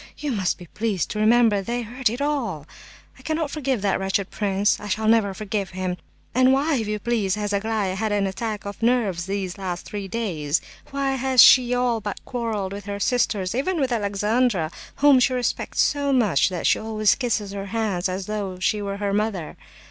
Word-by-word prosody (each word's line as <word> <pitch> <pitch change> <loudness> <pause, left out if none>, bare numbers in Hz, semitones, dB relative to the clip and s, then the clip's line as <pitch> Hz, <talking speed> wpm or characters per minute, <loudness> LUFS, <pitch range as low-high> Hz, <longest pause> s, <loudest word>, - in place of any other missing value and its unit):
You 295 -2 -3
must 195 -6 0
be 180 - -11
pleased 205 0 -2
to 210 - -3
remember 220 -1 +4
they 240 +4 -3
heard 245 +2 -1
it 240 +5 -5
all. 245 - -2 0.5
I - - -14
cannot 315 -2 -2
forgive 270 -8 -2
that 195 -2 +1
wretched 195 0 -1
prince. 200 0 +1
I 210 - -8 0.2
never 220 -1 +4
shall 195 - -4
forgive 205 -2 -3
him! 185 -1 -3 0.4
And 255 +1 +5
why, 280 +2 +2
if 220 -3 -2
you 210 0 -1
please, 210 -3 0
has 205 -1 -3
Aglaya 205 -2 0
had 215 +3 -2
an 205 -1 +1
attack 210 +2 -4
of 200 +2 -7
nerves 225 -8 +1
for 195 - -6
these 195 -1 -3
last 180 -2 -4
three 205 -2 -5
days? 175 -9 -1 0.3
Why 275 0 -1
has 260 -2 +6
she 250 -1 +6
all 245 -2 +1
but 205 -1 -5
quarrelled 220 -6 -3
with 200 0 -7
her 200 0 -4
sisters, 205 -5 0
even 315 +8 -1
with 265 -3 0
Alexandra—whom 215 - +1
she 255 +1 +3
respects 250 -1 -1
so 285 -1 +1
much 215 - +3
that 180 -2 -4
she - - +3
always 215 -1 +2
kisses 225 -6 -1
her 200 0 -5
hands 200 -4 -1
as 185 +1 -3
though 200 -3 -4
she 205 +3 0
were 200 -1 -3
her 200 -1 -2
mother? 205 -6 -2
210 Hz, 200 wpm, -23 LUFS, 195-245 Hz, 0.5 s, has